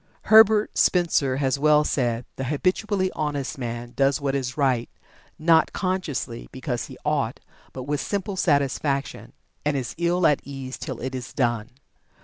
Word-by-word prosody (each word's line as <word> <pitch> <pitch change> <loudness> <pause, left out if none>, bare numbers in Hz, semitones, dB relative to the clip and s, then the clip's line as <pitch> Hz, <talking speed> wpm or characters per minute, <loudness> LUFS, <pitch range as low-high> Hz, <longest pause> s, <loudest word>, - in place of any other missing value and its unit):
Herbert 220 -1 +6
Spencer 155 -7 +2
has 135 0 0
well 150 0 +5
said: 120 -5 -1
"The 130 - -4
habitually 185 - 0
honest 145 -3 -3
man 120 0 -5
does 135 -1 +2
what 140 -1 -1
is 130 -1 -2
right, 130 -5 +1 0.5
not 160 0 +3
consciously 180 - -3
because - - -3
he - - -11
'ought' - - 0 0.3
but 130 - -7
with 145 +1 -2
simple 200 - -3
satisfaction; 140 -3 0 0.3
and 150 -1 0
is 125 -3 -4
ill 175 +1 +2
at 150 - +4
ease 135 -2 -7
till 130 -6 -6
it 130 +1 -4
is 125 -2 -6
done." 120 -3 0
140 Hz, 150 wpm, -24 LUFS, 130-170 Hz, 0.5 s, Herbert